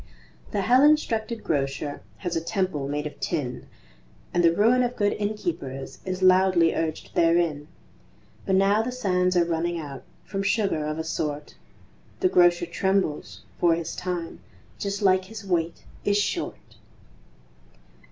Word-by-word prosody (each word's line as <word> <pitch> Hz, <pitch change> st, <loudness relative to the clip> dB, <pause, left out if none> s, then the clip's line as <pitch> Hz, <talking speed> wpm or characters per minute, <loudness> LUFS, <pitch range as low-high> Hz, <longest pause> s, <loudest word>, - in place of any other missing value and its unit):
The 205 Hz, -, -1 dB
hell 250 Hz, +7 st, +4 dB
instructed 235 Hz, -7 st, +2 dB
Grocer 140 Hz, 0 st, -2 dB, 0.2 s
Has 175 Hz, -2 st, -4 dB
a 165 Hz, -, 0 dB
temple 170 Hz, -6 st, -2 dB
made 145 Hz, +1 st, -2 dB
of 150 Hz, -, -7 dB
tin, 140 Hz, -7 st, -3 dB, 0.7 s
And 175 Hz, -, +2 dB
the 165 Hz, -, +6 dB
ruin 225 Hz, +8 st, +4 dB
of 245 Hz, 0 st, -1 dB
good 205 Hz, -1 st, +1 dB
innkeepers 170 Hz, -11 st, -4 dB
Is 185 Hz, 0 st, -3 dB
loudly 185 Hz, -2 st, +5 dB
urged 160 Hz, -1 st, -3 dB
therein; 165 Hz, -3 st, +2 dB, 0.8 s
But 190 Hz, -, +3 dB
now 200 Hz, +3 st, +4 dB
the 240 Hz, +3 st, -3 dB
sands 185 Hz, -7 st, +1 dB
are 170 Hz, -, +4 dB
running 170 Hz, +1 st, -1 dB
out 145 Hz, -4 st, -7 dB, 0.2 s
From 195 Hz, -, -3 dB
sugar 195 Hz, -6 st, 0 dB
of 155 Hz, 0 st, -3 dB
a 160 Hz, -, -2 dB
sort, 150 Hz, -2 st, -3 dB, 0.7 s
The 370 Hz, -, +3 dB
Grocer 175 Hz, -, +4 dB
trembles; 185 Hz, -2 st, -1 dB, 0.2 s
for 170 Hz, -1 st, +4 dB
his 165 Hz, -1 st, -5 dB
time, 180 Hz, -2 st, -4 dB, 0.4 s
Just 200 Hz, +1 st, -3 dB
like 185 Hz, -1 st, +4 dB
his 210 Hz, 0 st, -9 dB
weight, 170 Hz, -3 st, -1 dB, 0.2 s
is 205 Hz, 0 st, +2 dB
short. 205 Hz, -, -3 dB
180 Hz, 145 wpm, -25 LUFS, 160-200 Hz, 0.8 s, the